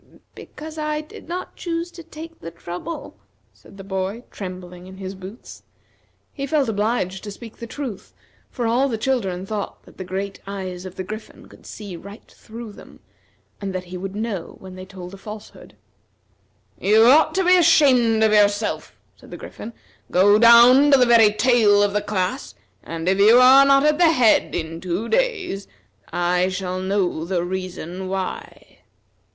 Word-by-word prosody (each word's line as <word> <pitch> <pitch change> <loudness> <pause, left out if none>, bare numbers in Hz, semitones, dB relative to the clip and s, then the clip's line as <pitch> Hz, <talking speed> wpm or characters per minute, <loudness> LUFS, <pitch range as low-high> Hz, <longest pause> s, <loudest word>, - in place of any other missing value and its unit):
"Because 310 +1 -10
I 305 0 -2
did 310 - -14
not 360 +1 -5
choose 335 0 -4
to 345 - -11
take 325 0 -11
the 165 - -8
trouble," 175 - -8 0.3
said 195 - -18
the 195 - -9
boy, 190 +4 -4
trembling 180 -2 -8
in 190 0 -12
his 190 0 -6
boots. 190 +5 -11 0.7
He 275 -1 -5
felt 285 -2 +1
obliged 205 -3 -1
to 210 - -6
speak 225 +2 -11
the 235 - -8
truth, 250 -5 -7 0.4
for 240 - -4
all 250 +4 +2
the 225 - -2
children 210 -7 -2
thought 205 0 -5
that - - -19
the 190 - -6
great 195 +2 -5
eyes 185 -2 -6
of 185 - -11
the 185 - -5
Griffin 215 +4 -9
could - - -17
see 205 -4 -8
right 200 +5 -13
through 230 0 -10
them, - - -15 0.6
and 195 -2 -4
that 185 - -3
he 180 0 -10
would 190 +2 -6
know 210 -5 -4
when 190 -1 -12
they 185 0 -10
told 185 -1 -10
a - - -9
falsehood. 210 - -11 1.0
"You 215 +4 +4
ought 310 +5 +5
to 380 - +2
be 365 +1 +6
ashamed 260 -10 +4
of 215 -1 +3
yourself," 205 0 +1 0.2
said - - -18
the - - -8
Griffin. 230 - -9 0.4
"Go 205 +3 +4
down 240 +5 +7
to 275 - +6
the 250 - +4
very 230 -3 +6
tail 215 -3 +4
of 205 -1 0
the 210 - 0
class, 180 - -3 0.3
and 165 +1 -6
if 190 +1 +2
you 215 +4 +7
are 265 +2 +8
not 275 +1 +5
at 300 +1 +2
the 345 -2 +6
head 250 -8 +3
in 165 0 -4
two 185 +5 -3
days, 430 - -1 0.4
I 180 +1 +1
shall 185 -1 -4
know 190 -4 -1
the 175 0 -1
reason 185 0 -5
why." 190 -1 -6
205 Hz, 175 wpm, -22 LUFS, 185-250 Hz, 1.0 s, are